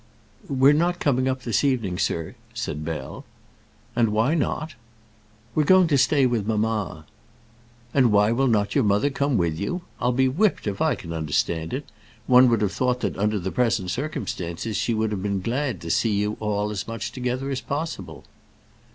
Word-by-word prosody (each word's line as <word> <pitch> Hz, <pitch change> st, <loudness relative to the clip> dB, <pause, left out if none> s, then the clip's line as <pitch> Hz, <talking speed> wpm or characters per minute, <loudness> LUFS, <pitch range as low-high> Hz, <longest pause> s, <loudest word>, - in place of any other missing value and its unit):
"We're 135 Hz, +1 st, +5 dB
not 175 Hz, +3 st, +1 dB
coming 130 Hz, -2 st, +1 dB
up 130 Hz, -1 st, -2 dB
this 115 Hz, +2 st, 0 dB
evening, 115 Hz, -10 st, 0 dB
sir," 80 Hz, -1 st, -1 dB, 0.2 s
said 75 Hz, +1 st, -4 dB
Bell. 75 Hz, -4 st, -5 dB, 0.7 s
"And 115 Hz, -2 st, +3 dB
why 110 Hz, +7 st, +2 dB
not?" 155 Hz, 0 st, -1 dB, 0.8 s
"We're 155 Hz, -, +2 dB
going 185 Hz, +4 st, +6 dB
to 145 Hz, -, +3 dB
stay 140 Hz, 0 st, +4 dB
with 115 Hz, -5 st, 0 dB
mamma." 105 Hz, -7 st, -1 dB, 0.9 s
"And 130 Hz, -5 st, +4 dB
why 105 Hz, +1 st, +4 dB
will 135 Hz, +3 st, +2 dB
not 105 Hz, -4 st, +1 dB
your 140 Hz, -, +3 dB
mother 105 Hz, +7 st, +2 dB
come 140 Hz, -2 st, 0 dB
with 85 Hz, -3 st, 0 dB
you? 175 Hz, -, -3 dB, 0.2 s
I'll 125 Hz, -, +1 dB
be 130 Hz, +2 st, +2 dB
whipped 185 Hz, +10 st, +1 dB
if 100 Hz, -2 st, -3 dB
I -, -, +3 dB
can 85 Hz, -1 st, -8 dB
understand 80 Hz, +1 st, -1 dB
it. 135 Hz, +2 st, -4 dB, 0.4 s
One 125 Hz, 0 st, +6 dB
would 115 Hz, -2 st, +2 dB
have 100 Hz, -2 st, 0 dB
thought 125 Hz, +3 st, 0 dB
that 100 Hz, -, -1 dB
under 105 Hz, +2 st, 0 dB
the 95 Hz, 0 st, -3 dB
present 115 Hz, -7 st, 0 dB
circumstances 110 Hz, -, -4 dB
she 110 Hz, +3 st, 0 dB
would 110 Hz, 0 st, 0 dB
have 100 Hz, -3 st, -3 dB
been 100 Hz, 0 st, -1 dB
glad 120 Hz, -, -2 dB
to 85 Hz, -, -4 dB
see 110 Hz, +3 st, +2 dB
you 105 Hz, +1 st, 0 dB
all 105 Hz, -1 st, -1 dB
as 100 Hz, -2 st, -4 dB
much 115 Hz, 0 st, -4 dB
together 130 Hz, +2 st, -3 dB
as 130 Hz, -1 st, -2 dB
possible." 120 Hz, -, -5 dB
115 Hz, 185 wpm, -24 LUFS, 100-130 Hz, 0.9 s, going